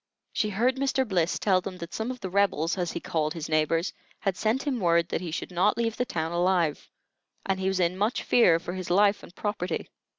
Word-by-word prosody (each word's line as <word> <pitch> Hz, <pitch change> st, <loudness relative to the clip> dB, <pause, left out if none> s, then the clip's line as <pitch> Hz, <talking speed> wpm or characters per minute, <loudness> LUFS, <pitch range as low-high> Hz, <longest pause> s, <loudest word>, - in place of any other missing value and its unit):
She 215 Hz, -, 0 dB
heard 240 Hz, +6 st, +1 dB
Mr. 265 Hz, -1 st, +1 dB
Bliss 180 Hz, -4 st, +1 dB
tell 185 Hz, -3 st, +2 dB
them 185 Hz, 0 st, -6 dB
that 170 Hz, -1 st, -8 dB
some 220 Hz, +2 st, -2 dB
of 255 Hz, -1 st, -5 dB
the 190 Hz, -, -4 dB
"Rebels," 180 Hz, -5 st, +2 dB
as 175 Hz, -3 st, -2 dB
he -, -, -3 dB
called 155 Hz, -1 st, -1 dB
his 160 Hz, -2 st, -4 dB
neighbors, 160 Hz, +3 st, +1 dB, 0.3 s
had 195 Hz, -2 st, 0 dB
sent 225 Hz, +7 st, 0 dB
him 275 Hz, -5 st, -1 dB
word 170 Hz, -3 st, +2 dB
that -, -, -2 dB
he 180 Hz, -, -4 dB
should 160 Hz, -, -4 dB
not 185 Hz, +4 st, +2 dB
leave 230 Hz, -1 st, 0 dB
the 250 Hz, -, 0 dB
town 160 Hz, -6 st, -2 dB
alive, 175 Hz, -3 st, +1 dB, 0.6 s
and 190 Hz, -1 st, 0 dB
he 190 Hz, -, -1 dB
was 190 Hz, -1 st, 0 dB
in 175 Hz, 0 st, +2 dB
much 210 Hz, +6 st, 0 dB
fear 180 Hz, -9 st, +5 dB
for 175 Hz, +1 st, -6 dB
his 185 Hz, -1 st, -5 dB
life 200 Hz, +3 st, +4 dB
and 180 Hz, -, -14 dB
property. 205 Hz, -5 st, -3 dB
185 Hz, 230 wpm, -27 LUFS, 170-210 Hz, 0.6 s, fear